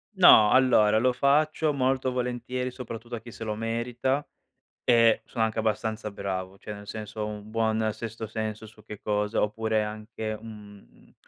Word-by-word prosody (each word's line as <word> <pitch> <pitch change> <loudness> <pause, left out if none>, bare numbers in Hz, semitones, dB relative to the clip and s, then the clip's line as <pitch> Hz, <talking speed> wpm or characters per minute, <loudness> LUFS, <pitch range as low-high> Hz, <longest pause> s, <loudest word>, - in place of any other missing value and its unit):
No, 110 - +8
allora, 110 -5 +5
lo 125 +2 +3
faccio 150 +3 +2
molto 130 -1 +1
volentieri 125 0 -2
soprattutto 120 -1 -7
a 115 - -5
chi 120 +1 -12
se - - -8
lo 110 -1 -2
merita 120 +5 -1 0.6
e 115 -2 +5
sono 115 - -3
anche 110 0 -2
abbastanza 110 0 -1
bravo, 95 -1 -5
cioè 105 - -7
nel 105 0 -11
senso 110 +1 -7
ho 105 - -1
un 105 0 -8
buon 110 0 +1
sesto 115 -1 -6
senso 110 0 -4
su 110 0 -17
che 105 - -9
cosa 105 0 0
oppure 110 +1 0
anche, 110 0 -5
uhm, 105 - -14
110 Hz, 165 wpm, -27 LUFS, 105-125 Hz, 0.6 s, No